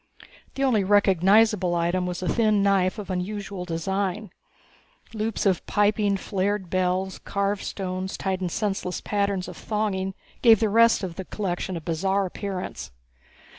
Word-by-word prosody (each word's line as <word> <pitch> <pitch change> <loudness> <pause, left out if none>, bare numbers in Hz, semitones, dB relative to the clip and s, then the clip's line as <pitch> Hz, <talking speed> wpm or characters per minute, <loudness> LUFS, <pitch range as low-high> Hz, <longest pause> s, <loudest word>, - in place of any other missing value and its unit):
The 275 - -1
only 235 -7 +3
recognizable 200 -1 +4
item 175 +2 0
was 180 0 -4
a - - -2
thin 215 -2 +2
knife 195 0 +2
of 205 -2 -6
unusual 195 0 -4
design. 190 +4 -2 0.8
Loops 220 0 -2
of 190 -3 +2
piping, 205 -1 +2
flared 195 -1 -2
bells, 185 +1 0
carved 200 0 -1
stones 185 -1 -4
tied 190 -1 -2
in 180 - -1
senseless 195 -1 -2
patterns 200 -2 -1
of 180 - -8
thonging 195 -3 -2 0.3
gave 225 -4 +7
the 220 - +2
rest 230 0 +4
of 175 -3 -5
the 190 - -5
collection 185 -2 -3
a - - -6
bizarre 190 +5 0
appearance. 185 - -5
195 Hz, 145 wpm, -25 LUFS, 185-205 Hz, 0.8 s, gave